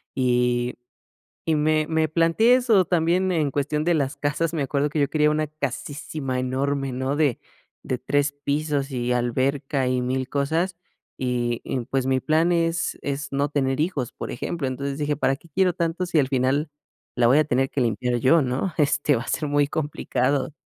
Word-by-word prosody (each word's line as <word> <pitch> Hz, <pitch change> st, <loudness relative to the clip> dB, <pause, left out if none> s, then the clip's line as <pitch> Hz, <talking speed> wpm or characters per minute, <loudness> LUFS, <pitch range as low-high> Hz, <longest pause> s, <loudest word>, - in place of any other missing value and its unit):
Y 125 Hz, -1 st, +1 dB, 0.7 s
y 160 Hz, -, +2 dB
me 155 Hz, 0 st, +2 dB
me 160 Hz, -1 st, +1 dB
planteé 165 Hz, +9 st, +4 dB
eso 225 Hz, -7 st, +3 dB
también 180 Hz, +2 st, +1 dB
en 155 Hz, -4 st, +1 dB
cuestión 145 Hz, +2 st, -1 dB
de 175 Hz, -, +2 dB
las 140 Hz, -3 st, -1 dB
casas, 150 Hz, +3 st, -1 dB
me 155 Hz, -4 st, -1 dB
acuerdo 140 Hz, +2 st, 0 dB
que 150 Hz, -, -1 dB
yo 140 Hz, -, +2 dB
quería 150 Hz, 0 st, +2 dB
una 155 Hz, 0 st, 0 dB
casísima 145 Hz, -1 st, -4 dB
enorme, 135 Hz, +1 st, -1 dB
¿no? 130 Hz, +3 st, -2 dB
De 145 Hz, -6 st, +2 dB, 0.4 s
de 130 Hz, -, -2 dB
3 145 Hz, +2 st, 0 dB
pisos, 145 Hz, -1 st, -1 dB
y 125 Hz, -1 st, -1 dB
alberca 130 Hz, +3 st, 0 dB
y 125 Hz, -1 st, 0 dB
1000 130 Hz, +1 st, -2 dB
cosas, 160 Hz, +6 st, 0 dB, 0.4 s
y 120 Hz, -2 st, -1 dB
y 130 Hz, -, -2 dB
pues 130 Hz, -1 st, -1 dB
mi 130 Hz, -1 st, +2 dB
plan 160 Hz, +2 st, +2 dB
es 165 Hz, 0 st, 0 dB
es 145 Hz, +1 st, -3 dB
no 140 Hz, +1 st, +1 dB
tener 135 Hz, -2 st, 0 dB
hijos, 145 Hz, -7 st, -1 dB
por -, -, -6 dB
ejemplo. 145 Hz, +3 st, -3 dB
Entonces 140 Hz, +2 st, -3 dB
dije, 150 Hz, -1 st, -1 dB
¿para 135 Hz, -1 st, +1 dB
qué 170 Hz, -, -20 dB
quiero 185 Hz, +3 st, +2 dB
tanto 170 Hz, +1 st, -2 dB
si 170 Hz, -3 st, +1 dB
al 135 Hz, -, +2 dB
final 135 Hz, +3 st, +1 dB, 0.4 s
la 120 Hz, -1 st, +3 dB
voy 135 Hz, +5 st, +5 dB
a 155 Hz, -, +4 dB
tener 135 Hz, -1 st, 0 dB
que 140 Hz, -, -2 dB
limpiar 120 Hz, +1 st, 0 dB
yo, 140 Hz, +6 st, +4 dB
¿no? 135 Hz, +8 st, -2 dB
Este, 145 Hz, -1 st, +2 dB
va 115 Hz, -, -3 dB
a -, -, -10 dB
ser 150 Hz, -, -1 dB
muy 145 Hz, 0 st, +2 dB
complicado. 145 Hz, -2 st, -1 dB
145 Hz, 190 wpm, -24 LUFS, 130-155 Hz, 0.7 s, voy